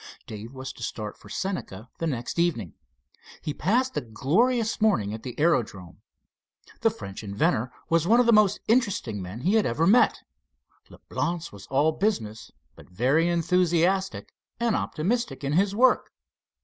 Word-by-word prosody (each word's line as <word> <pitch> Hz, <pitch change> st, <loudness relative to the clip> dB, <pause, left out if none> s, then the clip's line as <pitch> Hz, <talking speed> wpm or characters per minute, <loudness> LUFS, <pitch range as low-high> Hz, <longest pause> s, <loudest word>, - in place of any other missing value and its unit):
Dave 110 Hz, +2 st, -8 dB
was 130 Hz, -1 st, -7 dB
to -, -, -15 dB
start 105 Hz, -2 st, -5 dB
for -, -, -16 dB
Senca 125 Hz, -, -4 dB
the 165 Hz, -, -1 dB
next 125 Hz, +2 st, -3 dB
evening. 135 Hz, -, 0 dB, 0.7 s
He 150 Hz, -, -4 dB
passed 250 Hz, -, 0 dB
a -, -, 0 dB
glorious 215 Hz, -, +1 dB
morning 110 Hz, -, +2 dB
at 110 Hz, -, -6 dB
the 125 Hz, +2 st, -8 dB
aerodrome. 110 Hz, -, 0 dB, 0.8 s
The -, -, +3 dB
French 100 Hz, +1 st, -8 dB
inventor 105 Hz, +4 st, 0 dB, 0.2 s
was 165 Hz, 0 st, +2 dB
one 230 Hz, +4 st, +5 dB
of 245 Hz, -, +4 dB
the 235 Hz, -, +5 dB
most 210 Hz, -1 st, +4 dB
interesting 200 Hz, -, +1 dB
men 95 Hz, +6 st, -7 dB
he 185 Hz, +8 st, +1 dB
had 220 Hz, -2 st, +3 dB
ever 145 Hz, +8 st, +1 dB
met. 230 Hz, +7 st, +4 dB, 0.7 s
Leblance 170 Hz, -1 st, -4 dB
was 100 Hz, -1 st, -12 dB
all 145 Hz, +4 st, +2 dB
business, 115 Hz, -, -2 dB, 0.3 s
but -, -, -16 dB
very 135 Hz, -, +2 dB
enthusiastic 180 Hz, +2 st, +1 dB, 0.3 s
and 235 Hz, -2 st, +1 dB
optimistic 230 Hz, +5 st, -2 dB
in 140 Hz, +1 st, -1 dB
his 195 Hz, +4 st, +2 dB
work. 255 Hz, +3 st, +3 dB
165 Hz, 155 wpm, -26 LUFS, -, 0.8 s, one